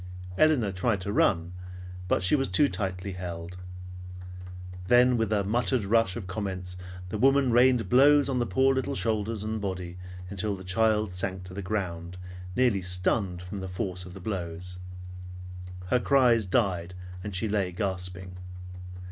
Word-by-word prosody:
Elinor 135 Hz, -6 st, +3 dB
tried 100 Hz, +3 st, 0 dB
to 100 Hz, +2 st, -3 dB
run, 85 Hz, -3 st, +2 dB, 0.5 s
but 95 Hz, -, +1 dB
she 95 Hz, -, +4 dB
was 135 Hz, -6 st, 0 dB
too 120 Hz, +11 st, +4 dB
tightly 95 Hz, -4 st, -3 dB
held. 90 Hz, -1 st, -6 dB, 1.3 s
Then 125 Hz, +2 st, +5 dB
with 115 Hz, -2 st, 0 dB
a 105 Hz, -2 st, +2 dB
muttered 110 Hz, +2 st, +1 dB
rush 100 Hz, -2 st, +2 dB
of 110 Hz, -, -5 dB
comments, 95 Hz, -2 st, -4 dB, 0.3 s
the 105 Hz, -, -4 dB
woman 135 Hz, +1 st, +4 dB
rained 125 Hz, 0 st, +4 dB
blows 140 Hz, +3 st, +6 dB
on 130 Hz, -2 st, 0 dB
the 120 Hz, -, 0 dB
poor 135 Hz, +2 st, +3 dB
little 135 Hz, +1 st, -1 dB
shoulders 110 Hz, -1 st, -1 dB
and 110 Hz, 0 st, -3 dB
body 90 Hz, -2 st, -4 dB, 0.3 s
until 100 Hz, +2 st, -2 dB
the 95 Hz, -, -10 dB
child 105 Hz, +1 st, +1 dB
sank 95 Hz, 0 st, -3 dB
to 90 Hz, 0 st, -9 dB
the 100 Hz, -, -5 dB
ground, 90 Hz, -3 st, -4 dB, 0.4 s
nearly 120 Hz, -5 st, +3 dB
stunned 90 Hz, 0 st, -1 dB
from 95 Hz, +2 st, -6 dB
the 95 Hz, 0 st, -5 dB
force 90 Hz, 0 st, -3 dB
of 90 Hz, +1 st, -11 dB
the -, -, -8 dB
blows. 90 Hz, -2 st, -5 dB, 1.1 s
Her 125 Hz, -, +3 dB
cries 120 Hz, -5 st, +3 dB
died, 95 Hz, -4 st, 0 dB, 0.3 s
and 100 Hz, -2 st, -5 dB
she 100 Hz, +5 st, 0 dB
lay 100 Hz, -3 st, 0 dB
gasping. 90 Hz, -1 st, -4 dB
100 Hz, 155 wpm, -28 LUFS, 90-115 Hz, 1.3 s, blows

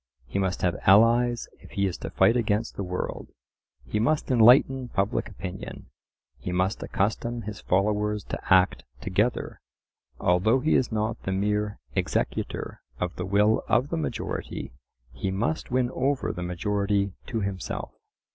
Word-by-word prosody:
He 80 Hz, +11 st, -3 dB
must 95 Hz, -2 st, -1 dB
have 90 Hz, -2 st, +1 dB
allies 115 Hz, +4 st, +5 dB
if -, -, -15 dB
he 100 Hz, -3 st, +1 dB
is 95 Hz, -, -1 dB
to -, -, -5 dB
fight 115 Hz, -, +4 dB
against 110 Hz, -1 st, 0 dB
the -, -, -4 dB
world; 90 Hz, 0 st, -4 dB, 0.6 s
he 105 Hz, -, -1 dB
must 150 Hz, +5 st, +1 dB
enlighten 125 Hz, +2 st, +6 dB
public 100 Hz, -2 st, -1 dB
opinion; 95 Hz, -1 st, -8 dB, 0.5 s
he 90 Hz, -, -4 dB
must 95 Hz, +3 st, 0 dB
accustom 115 Hz, +4 st, -1 dB
his 105 Hz, 0 st, -7 dB
followers 105 Hz, +2 st, +1 dB
to -, -, -3 dB
act 95 Hz, 0 st, +4 dB, 0.2 s
together. 105 Hz, -, -1 dB, 0.6 s
Although 95 Hz, +8 st, +3 dB
he 155 Hz, +5 st, +1 dB
is 125 Hz, -, +2 dB
not 110 Hz, +1 st, -1 dB
the 95 Hz, -, -3 dB
mere 105 Hz, +2 st, 0 dB, 0.2 s
executor -, -, -2 dB, 0.2 s
of 90 Hz, 0 st, -2 dB
the 90 Hz, -, -4 dB
will 105 Hz, +3 st, +3 dB
of 130 Hz, +4 st, +2 dB
the -, -, -1 dB
majority, 75 Hz, -4 st, -4 dB, 0.4 s
he 65 Hz, +10 st, -3 dB
must 110 Hz, +12 st, -1 dB
win 125 Hz, 0 st, +1 dB
over 135 Hz, +2 st, 0 dB
the 90 Hz, -, -6 dB
majority 100 Hz, +2 st, 0 dB
to 115 Hz, -3 st, -2 dB
himself. 100 Hz, -2 st, -4 dB
105 Hz, 150 wpm, -26 LUFS, 95-115 Hz, 0.6 s, enlighten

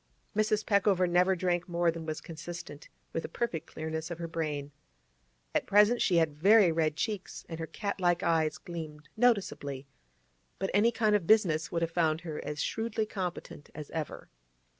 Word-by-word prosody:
Mrs. 215 Hz, 0 st, +1 dB
Peckover 200 Hz, -3 st, +3 dB
never 180 Hz, +2 st, +3 dB
drank 175 Hz, 0 st, -1 dB
more 170 Hz, 0 st, +2 dB
than 165 Hz, -1 st, -7 dB
was 155 Hz, -1 st, -3 dB
consistent 165 Hz, -2 st, -8 dB, 0.2 s
with 165 Hz, -, -1 dB
the -, -, -6 dB
perfect 170 Hz, -9 st, -3 dB
clearness 160 Hz, +1 st, -4 dB
of 170 Hz, -, -5 dB
her 170 Hz, -1 st, -4 dB
brain. 150 Hz, -3 st, -3 dB, 0.8 s
At -, -, 0 dB
present 210 Hz, +4 st, +5 dB
she 180 Hz, -, +3 dB
had 160 Hz, -3 st, +3 dB
very 195 Hz, +4 st, +6 dB
red 160 Hz, -2 st, +1 dB
cheeks, 205 Hz, +2 st, -4 dB
and 165 Hz, -1 st, -6 dB
her 160 Hz, -, -4 dB
cat 200 Hz, +1 st, -4 dB
like 175 Hz, -1 st, +2 dB
eyes 160 Hz, -2 st, +2 dB
gleamed 155 Hz, -4 st, -8 dB
noticeably, 195 Hz, -, +1 dB, 0.7 s
but 195 Hz, -, -2 dB
any 215 Hz, +4 st, +4 dB
kind 215 Hz, -2 st, +2 dB
of 185 Hz, -5 st, 0 dB
business 170 Hz, -8 st, +3 dB
would 170 Hz, 0 st, 0 dB
have 165 Hz, -, -1 dB
found 160 Hz, -2 st, +1 dB
her 160 Hz, -3 st, -5 dB
as 150 Hz, 0 st, -3 dB
shrewdly 220 Hz, -1 st, -1 dB
competent 180 Hz, -7 st, -5 dB
as 150 Hz, -2 st, -8 dB
ever. 160 Hz, -2 st, -5 dB
170 Hz, 175 wpm, -30 LUFS, 160-200 Hz, 0.8 s, very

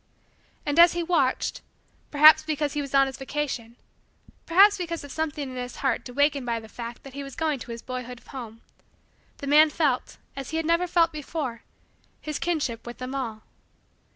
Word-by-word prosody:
And, 290 Hz, +2 st, +1 dB
as 345 Hz, 0 st, +8 dB
he 345 Hz, 0 st, -1 dB
watched, 325 Hz, -7 st, 0 dB, 0.5 s
perhaps 305 Hz, +1 st, +8 dB
because 305 Hz, -2 st, -2 dB
he 295 Hz, -, -1 dB
was 275 Hz, -1 st, -4 dB
on 275 Hz, 0 st, +6 dB
his 265 Hz, 0 st, -6 dB
vacation, 265 Hz, -4 st, -4 dB, 0.7 s
perhaps 400 Hz, +5 st, +6 dB
because 335 Hz, -4 st, -4 dB
of 285 Hz, -, -9 dB
something 300 Hz, -2 st, -3 dB
in -, -, -8 dB
his 245 Hz, 0 st, -5 dB
heart 270 Hz, -1 st, -1 dB
awakened 285 Hz, +1 st, +1 dB
by 230 Hz, -1 st, 0 dB
the 220 Hz, -, -12 dB
fact 235 Hz, +1 st, -8 dB
that 275 Hz, -, -11 dB
he 280 Hz, -, -6 dB
was 275 Hz, -1 st, -8 dB
going 315 Hz, -4 st, -1 dB
to 240 Hz, -, -10 dB
his 230 Hz, 0 st, -7 dB
boyhood 250 Hz, -1 st, -6 dB
home, 230 Hz, -4 st, -9 dB, 0.8 s
the -, -, -7 dB
man 300 Hz, +2 st, +6 dB
felt, 295 Hz, -5 st, -1 dB, 0.2 s
as 270 Hz, -2 st, -6 dB
he 320 Hz, -, -2 dB
had 325 Hz, -, -1 dB
never 335 Hz, +2 st, +2 dB
felt 335 Hz, -1 st, +3 dB
before, 290 Hz, -5 st, -5 dB, 0.6 s
his 305 Hz, -1 st, -5 dB
kinship 285 Hz, -10 st, -2 dB
with 240 Hz, -, -7 dB
them 255 Hz, +1 st, -6 dB
all. 230 Hz, -5 st, -4 dB
280 Hz, 185 wpm, -26 LUFS, 250-315 Hz, 0.8 s, as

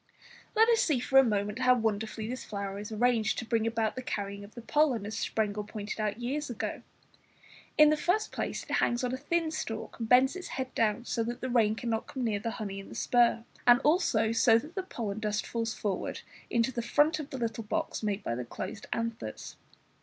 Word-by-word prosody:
Let 445 Hz, +1 st, +6 dB
us 465 Hz, -1 st, +4 dB
see 295 Hz, -6 st, +2 dB
for 270 Hz, +2 st, +5 dB
a -, -, +7 dB
moment 210 Hz, -1 st, 0 dB
how 255 Hz, -1 st, +5 dB
wonderfully 220 Hz, -1 st, -1 dB
this 255 Hz, +2 st, -4 dB
flower 200 Hz, -1 st, -4 dB
is 210 Hz, +1 st, -7 dB
arranged 225 Hz, 0 st, +2 dB
to 245 Hz, -, -3 dB
bring 225 Hz, 0 st, +1 dB
about 225 Hz, -1 st, 0 dB
the 255 Hz, -, -4 dB
carrying 200 Hz, -4 st, -4 dB
of 200 Hz, -, -13 dB
the 235 Hz, -, -8 dB
pollen, 270 Hz, -7 st, +2 dB
as 215 Hz, +1 st, -5 dB
Sprengel 210 Hz, -2 st, -1 dB
pointed 210 Hz, +1 st, -6 dB
out 215 Hz, +1 st, -1 dB
years 275 Hz, +5 st, -2 dB
ago. 240 Hz, -, -4 dB, 1.0 s
In 305 Hz, 0 st, +8 dB
the 305 Hz, -, +2 dB
first 365 Hz, +8 st, +1 dB
place, -, -, -3 dB
it -, -, -11 dB
hangs 240 Hz, +1 st, +1 dB
on 250 Hz, 0 st, -1 dB
a -, -, -1 dB
thin 320 Hz, +4 st, 0 dB
stalk, 225 Hz, -9 st, -5 dB
and 225 Hz, -1 st, -3 dB
bends 260 Hz, +5 st, +5 dB
its 370 Hz, -, -6 dB
head 260 Hz, -1 st, -3 dB
down 225 Hz, +1 st, +1 dB
so 235 Hz, -, -1 dB
that 240 Hz, +1 st, -4 dB
the 255 Hz, -, -2 dB
rain 220 Hz, -3 st, +3 dB
cannot 225 Hz, -1 st, -2 dB
come 260 Hz, -3 st, -4 dB
near 215 Hz, -3 st, 0 dB
the 230 Hz, -, -3 dB
honey 200 Hz, -2 st, -4 dB
in 195 Hz, -, -10 dB
the -, -, -10 dB
spur, 240 Hz, -2 st, +3 dB, 0.2 s
and 245 Hz, 0 st, +8 dB
also 270 Hz, -, +3 dB
so 225 Hz, 0 st, +5 dB
that 300 Hz, +8 st, -6 dB
the 385 Hz, -, -2 dB
pollen 220 Hz, -, -4 dB
dust 210 Hz, -1 st, -1 dB
falls 230 Hz, -1 st, -2 dB
forward 200 Hz, -3 st, -3 dB, 0.3 s
into 235 Hz, +2 st, +2 dB
the 235 Hz, -, -2 dB
front 295 Hz, +6 st, +3 dB
of 300 Hz, -2 st, -6 dB
the 265 Hz, -, -5 dB
little 230 Hz, -2 st, -2 dB
box 210 Hz, -, -2 dB
made 210 Hz, -2 st, -1 dB
by -, -, -2 dB
the 125 Hz, +1 st, -3 dB
closed 185 Hz, -, -7 dB
anthers. 230 Hz, -, -4 dB
230 Hz, 220 wpm, -30 LUFS, 215-255 Hz, 1.0 s, In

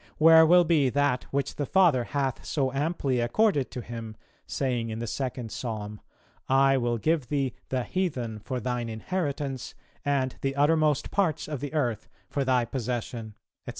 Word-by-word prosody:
where 160 Hz, 0 st, +8 dB
will 175 Hz, +2 st, +7 dB
be 155 Hz, -5 st, +3 dB
that 140 Hz, -1 st, +1 dB
which 140 Hz, 0 st, -2 dB
the 145 Hz, -, -1 dB
Father 165 Hz, -11 st, +4 dB
hath 135 Hz, -2 st, -2 dB
so 135 Hz, -3 st, -1 dB
amply 140 Hz, -2 st, 0 dB
accorded 145 Hz, -, +2 dB
to 125 Hz, -, -6 dB
Him, 115 Hz, -2 st, -7 dB, 0.3 s
saying 125 Hz, -4 st, -1 dB
in 110 Hz, -, -4 dB
the 115 Hz, -, -3 dB
second 125 Hz, -1 st, -4 dB
Psalm 105 Hz, -3 st, -5 dB, 0.5 s
'I 135 Hz, 0 st, +4 dB
will 120 Hz, -2 st, 0 dB
give 155 Hz, +1 st, 0 dB
thee 135 Hz, -2 st, -1 dB, 0.2 s
the 130 Hz, -1 st, 0 dB
heathen 125 Hz, -, -2 dB
for 125 Hz, +4 st, -4 dB
Thine 120 Hz, -1 st, -2 dB
inheritance 140 Hz, +1 st, -3 dB, 0.3 s
and 135 Hz, -3 st, 0 dB
the 135 Hz, 0 st, -1 dB
uttermost 150 Hz, 0 st, +2 dB
parts 185 Hz, -7 st, 0 dB
of 150 Hz, -3 st, -4 dB
the 145 Hz, +3 st, -5 dB
earth 120 Hz, -8 st, -1 dB, 0.2 s
for 140 Hz, -, 0 dB
Thy 130 Hz, -2 st, +2 dB
possession,' 115 Hz, -2 st, -4 dB, 0.3 s
&c.? -, -, -4 dB
135 Hz, 165 wpm, -27 LUFS, 120-150 Hz, 0.5 s, where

